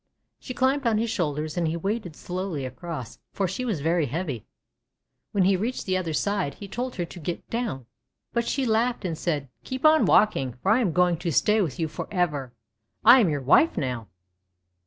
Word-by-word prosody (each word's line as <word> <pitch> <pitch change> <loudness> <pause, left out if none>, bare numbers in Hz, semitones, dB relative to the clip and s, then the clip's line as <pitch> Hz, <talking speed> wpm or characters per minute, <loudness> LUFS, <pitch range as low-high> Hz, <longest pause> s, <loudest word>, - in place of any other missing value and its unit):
She 255 - -7
climbed 265 +1 +2
on 220 -2 +3
his 225 +1 0
shoulders, 155 -6 -2
and 170 -2 +1
he 160 +1 -1
waded 195 -2 -3
slowly 180 -6 -4
across, 130 0 -7
for 195 - 0
she 190 +8 -4
was 215 - -2
very 165 0 +1
heavy. 145 - -4 0.8
When 195 - +2
he 190 +1 +4
reached 225 +7 -2
the 185 - 0
other 180 -3 -1
side, 190 -1 -1
he 200 - -9
told 245 +5 -4
her 175 - -2
to 175 - -11
get 170 +2 -5
down, 230 - -2 0.5
but 235 -1 0
she 270 -2 0
laughed 230 0 +1
and 170 -3 -1
said: 150 -4 -2
— - - -48
"Keep 260 +3 -4
on 310 0 +6
walking, 135 - +3
for 195 - +3
I 225 - +5
am 215 -9 +1
going 180 0 +3
to 170 +1 -2
stay 210 - +3
with 160 -7 -2
you 160 - 0
for - - -6
ever. 150 -9 -1 0.5
I 260 - +9
am 205 -8 +4
your 145 -2 -1
wife 150 - +4
now!' 125 - -2
180 Hz, 205 wpm, -26 LUFS, 155-220 Hz, 0.8 s, I